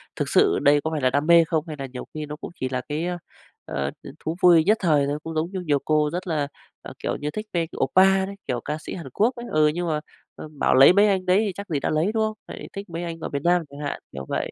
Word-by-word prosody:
thực - - -2
sự - - +4
đây 145 0 +4
có 160 - -2
phải 155 -2 -2
là 130 - +3
đam 145 +4 0
mê 170 0 +7
không, 160 -1 -1
hay 155 - -5
là 135 - -3
nhiều 125 -1 -8
khi 155 -1 -4
nó 150 0 -7
cũng - - -9
chỉ 130 - -2
là 130 -1 -2
cái, 155 +3 -2
ơ, 180 0 -2 0.5
ờ, 70 0 -3
ừm, - - -9
thú 160 +2 -3
vui 170 -3 +7
nhất 215 +5 +3
thời 150 -5 +3
thôi. 145 +1 -2
Cũng 160 0 -6
giống 160 +3 -1
như 190 - -3
nhiều 150 -5 +1
cô 150 -1 +2
rất 180 +1 -4
là, 150 -4 0 0.3
ờ, - - -9
kiểu - - -1
như, 150 +1 -4
thích 215 0 -5
vê, 165 -2 0
kiểu, - - -9
oppa 190 +6 +4
đấy, 200 +1 -7
kiểu, 120 -1 -2
ca 150 +1 -2
sĩ - - -7
Hàn 165 -7 -8
Quốc 240 +5 +2
ấy, 240 0 -7
ừ, 155 0 +4
nhưng 175 +3 -1
mà, 155 -2 0 0.4
ờ, - - -8
bảo - - +3
lấy 135 +6 +8
mấy 205 +2 +5
anh 190 -2 +1
đấy 185 +1 +4
thì - - -1
chắc 200 0 -8
gì 150 -4 0
đã - - -2
lấy, 160 +6 +1
đúng 220 - +1
hông? 215 0 -2
Lại - - -8
thích 200 0 -7
mấy 170 +1 -5
anh 165 -1 -5
ở - - -5
Việt 140 - -3
Nam 175 0 +3
chẳng 140 +1 -11
hạn, 145 -1 -4
kiểu 65 0 -7
vậy. - - -2
160 Hz, 305 wpm, -24 LUFS, 145-180 Hz, 0.5 s, lấy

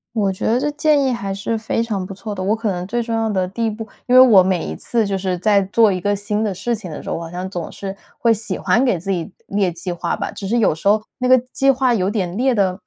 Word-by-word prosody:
我 200 -3 +1
觉 185 - -5
得 230 - +3
这 295 +3 0
建 300 -1 +2
议 265 - +1
还 200 -5 -3
是 200 +4 -2
非 220 +1 -1
常 205 -5 -3
不 195 - -7
错 210 +2 -6
的， 190 - -5
我 200 +3 +1
可 220 -2 -2
能 180 0 -4
最 240 +3 -1
重 230 0 -4
要 225 0 0
的 190 -3 0
第 230 +4 -2
一 - - +1
步 220 +1 -6 0.2
因 250 - +3
为 255 - +10
我 225 -7 +8
每 185 -2 0
一 - - -4
次 230 -2 -1
就 195 -1 -1
是 185 -1 -2
在 200 +2 +3
做 210 +2 +3
一 185 - -1
个 205 +3 0
新 205 +1 -2
的 210 -3 0
事 235 +6 -2
情 210 -5 -5
的 150 - -7
时 - - -6
候， - - -2
我 - - -6
好 - - -8
像 180 +2 -5
总 175 -4 -5
是 195 -1 -6 0.2
会 230 -1 +3
喜 220 0 -4
欢 240 +3 +2
给 245 -8 +2
自 195 +4 -4
己 175 0 -2 0.2
列 200 -2 +1
计 175 +2 -5
划 175 0 -2
吧。 - - -4
只 195 - -7
是 235 +4 +1
有 220 - +3
时 160 +5 -5
候 215 +1 +4
那 250 - -1
个 255 0 +7
计 240 - -3
计 275 - +2
划 260 -1 +2
有 190 -4 +1
点 195 -3 -2
列 255 0 +2
的， 190 -2 +1
205 Hz, 330 characters per minute, -19 LUFS, 190-230 Hz, 0.2 s, 为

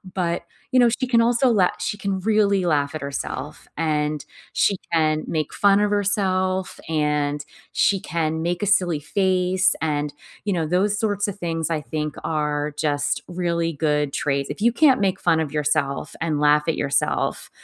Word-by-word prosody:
But, 170 -2 -1 0.3
you 255 - +4
know, 240 -1 +6
she 255 +2 -1
can 235 -2 +4
also 240 +2 +3
la 195 -6 +4
she 210 +4 -2
can 195 -2 -2
really 200 -3 +2
laugh 145 -3 +1
at 155 - -5
herself 140 0 -5
and 150 -2 -1 0.3
she 200 - +2
can 155 -2 +2
make 155 -2 -2
fun 200 0 +4
of 210 0 +2
herself 190 -2 0
and 150 -1 0 0.3
she 195 -2 +2
can 160 -2 -2
make 175 +3 -1
a - - +2
silly 175 -6 +2
face 185 +2 +1
and 150 -2 -1 0.3
you 205 - 0
know 165 -3 -1
those 200 +4 +1
sorts 205 -2 0
of 200 - -7
things 165 -2 -2
I 160 -2 0
think 150 0 -4
are 150 -1 -1
just 145 -2 0
really 170 -2 -1
good 150 -1 0
traits 140 -1 -1
if - - -8
you 235 +1 +3
can't 270 -2 +5
make 190 -1 +1
fun 160 - +2
of 150 -3 -2
yourself 145 -2 -1
and 155 -3 0
laugh 150 0 +4
at 165 - +1
yourself, 140 0 0
170 Hz, 175 wpm, -23 LUFS, 150-200 Hz, 0.3 s, know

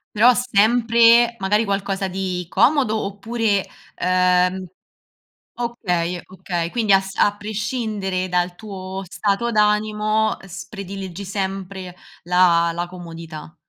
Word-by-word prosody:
Però 240 +4 +6
sempre, 235 +1 +4
magari, 205 +3 +2
qualcosa 195 -1 -2
di 185 -1 -3
comodo 255 -5 +3
oppure, 205 0 -1 0.3
ehm 180 0 +2 0.9
okay, 180 -8 -2
okay 180 -2 -4
quindi 220 -2 +1
as 195 0 +2
a 205 0 +3
prescindere 210 -3 -3
dal 180 0 0
tuo 190 -1 -7
stato 200 +5 -1
d'animo, 215 0 +1
ehm, 195 - -14
s 185 - -8
prediligi 195 -1 -7
sempre 190 -2 -5 0.3
la 175 -1 +4
la 175 +1 -3
comodità. 165 -2 -10
195 Hz, 110 wpm, -21 LUFS, 180-215 Hz, 0.9 s, Però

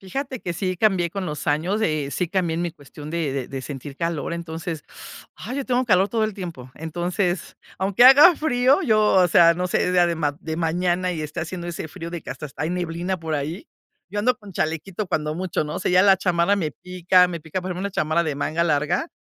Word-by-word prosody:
Fíjate 260 +6 -5
que 175 - -3
sí 185 +1 -2
cambié 190 -4 +2
con 195 +2 -4
los 150 -4 -5
años, 170 +8 0
eh, 155 -8 0
sí 175 +3 -2
cambié 175 -4 0
en 170 - -2
mi 175 - -2
cuestión 150 -1 -12
de 165 -4 -1
de 135 -3 -3
de 135 -1 -5
sentir 135 +1 -8
calor, 165 -1 -2
entonces, 165 -1 -5 0.5
ay, 255 - -6
yo 280 - -2
tengo 255 0 0
calor 195 -2 +4
todo 225 0 +1
el 215 -2 -3
tiempo. 165 -10 -8
Entonces, 175 +3 -2 0.2
aunque 195 +5 +3
haga 295 +6 +9
frío, 265 +2 +2
yo, 215 -5 +3
o 185 -2 +6
sea, 170 0 +6
no 180 +1 -2
sé, 180 0 0
sea 175 -1 +4
de 170 - 0
ma 145 -3 -1
de 160 -2 -5
mañana 175 +2 0
y 160 - -4
esté 150 +2 -5
haciendo 175 +1 -5
ese 165 -2 -5
frío 165 +2 -8
de 175 -1 -5
que - - -13
hast 135 +2 -7
hasta 145 -1 -6
hay 155 - -1
neblina 180 +1 -2
por 160 -1 -3
ahí. 155 - -4 0.4
Yo 205 - -3
ando 245 +3 +2
con 205 -5 -13
chalequito 170 +5 -3
cuando 150 -1 -1
mucho, 180 -3 -2
¿no? 150 - -5
O - - -2
sea, 185 - 0
ya 180 +1 +5
la 195 -1 +6
chamarra 180 +2 +2
me 160 -6 -1
pica, 180 +2 +2
me 170 -2 -5
pica. 160 +4 -4
Por 185 +1 -5
ejemplo 180 - -4
una 200 +1 -2
chamarra 155 -1 +1
de 155 -4 -3
manga 160 +3 0
larga, 160 - 0
175 Hz, 235 wpm, -23 LUFS, 160-190 Hz, 0.5 s, haga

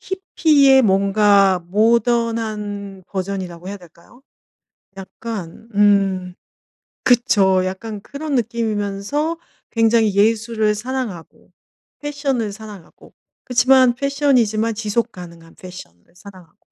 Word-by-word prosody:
히피의 300 -8 +3
뭔가 200 -1 +3
모던한 215 -3 -1
버전이라고 185 -2 -5
해야 205 - -5
될까요? 175 +8 -19 0.7
약간 205 +1 -8
음 195 -3 +2 0.7
그쵸. 200 -7 +3
약간 200 +2 -6
그런 285 +3 -5
느낌이면서 230 +6 -2 0.3
굉장히 225 -3 +2
예술을 220 0 +1
사랑하고 225 -6 -6 0.5
패션을 280 -7 -2
사랑하고. 210 -5 -13 0.3
그치만 255 0 +4
패션이지만 250 -6 +1
지속 225 +2 -2
가능한 170 -3 -13
패션을 180 - -13
사랑하고. 180 -3 -15
215 Hz, 250 characters per minute, -19 LUFS, 195-240 Hz, 0.7 s, 그치만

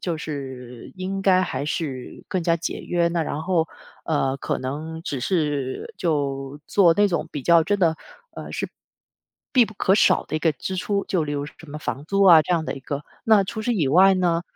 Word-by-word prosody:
就 170 -3 -2
是 130 -6 -7
应 190 +1 -3
该 185 -1 +4
还 160 -5 -3
是 140 -6 -4
更 185 -3 -1
加 170 0 +2
节 165 - -4
约。 170 -1 +1
那 170 -1 0
然 155 0 -3
后， 165 -2 +1 0.4
呃， 135 -4 0
可 - - -2
能 155 +5 -5
只 140 -6 -4
是 150 - -1
就 140 -4 -2
做 175 -5 +4
那 205 +2 +4
种 175 -3 -2
比 145 - -5
较 170 +1 +5
真 205 +4 0
的 165 -3 +2 0.4
呃， - - -8
是， - - -3 0.9
必 250 -3 +6
不 215 - -12
可 190 -1 +2
少 210 - +4
的 - - -3
一 - - 0
个 160 0 +2
支 145 +7 -5
出， 200 +2 -1
就 180 -4 0
例 145 - -4
如 145 -1 -2
什 150 - -11
么 150 0 -8
房 140 - -4
租 200 +2 +1
啊 170 -4 +9
这 155 +4 -1
样 165 -2 0
的 - - -3
一 135 - -9
个。 140 +2 -5 0.2
那 215 -3 +5
除 210 +3 -5
此 240 - 0
以 160 -10 +1
外 190 +7 +6
呢， 175 -2 +1
165 Hz, 230 characters per minute, -23 LUFS, 145-185 Hz, 0.9 s, 啊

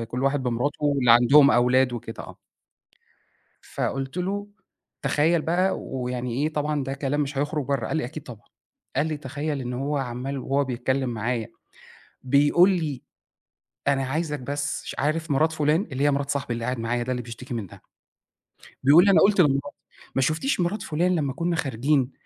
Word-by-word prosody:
كل 125 +3 -4
واحد 135 0 +1
بمراته 125 +5 -2
واللي 140 -5 +3
عندهم 140 +4 +7
أولاد 125 +1 +3
وكده 115 -1 -6
آه. - - -12 1.2
فقُلت 135 +4 -4
له: 200 +3 -2 0.6
"تخيّل 160 +2 +2
بقى 180 +3 +1
ويعني 125 0 -3
إيه 155 - 0
طبعًا 150 -2 -1
ده 135 +1 -3
كلام 140 +1 -1
مش 140 -1 -2
هيخرُج 145 +1 -1
برّه."، 140 -4 -1
قال - - -2
لي: 155 - -1
"أكيد 150 +3 -7
طبعًا."، 115 -8 -12 0.5
قال 150 +3 +2
لي: 155 -1 -2
"تخيّل 145 +1 -4
إن 125 0 -4
هو 140 +4 -2
عمّال 130 +2 -4
وهو 135 +2 0
بيتكلّم 130 +1 -1
معايا 115 0 -2 0.8
بيقول 145 +8 +4
لي 155 -7 -2 0.9
أنا 135 -1 +2
عايزك 150 +2 -2
بس 145 +2 -3
ش - - -6
عارف 155 +2 -1
مرات 155 +4 +3
فُلان؟"، 155 +2 +2
اللي 135 +2 -2
هي 145 - +4
مرات 140 0 -1
صاحبي 135 -4 -2
اللي 115 0 -4
قاعد 125 -1 -2
معايا 120 +1 -1
ده 130 - -3
اللي 125 -1 -2
بيشتكي 120 +3 -8
منها، 105 -6 -6 1.0
بيقول 155 +8 +7
لي: 200 - +5
"أنا - - +5
قُلت 200 -1 +4
لمراتي 140 -1 0 0.4
ما 135 - +2
شُفتيش 160 - 0
مرات 180 +5 -1
فُلان 175 +4 0
لمّا 145 -5 -1
كنا 170 +3 -1
خارجين 135 -1 0
140 Hz, 175 wpm, -25 LUFS, 125-155 Hz, 1.2 s, عندهم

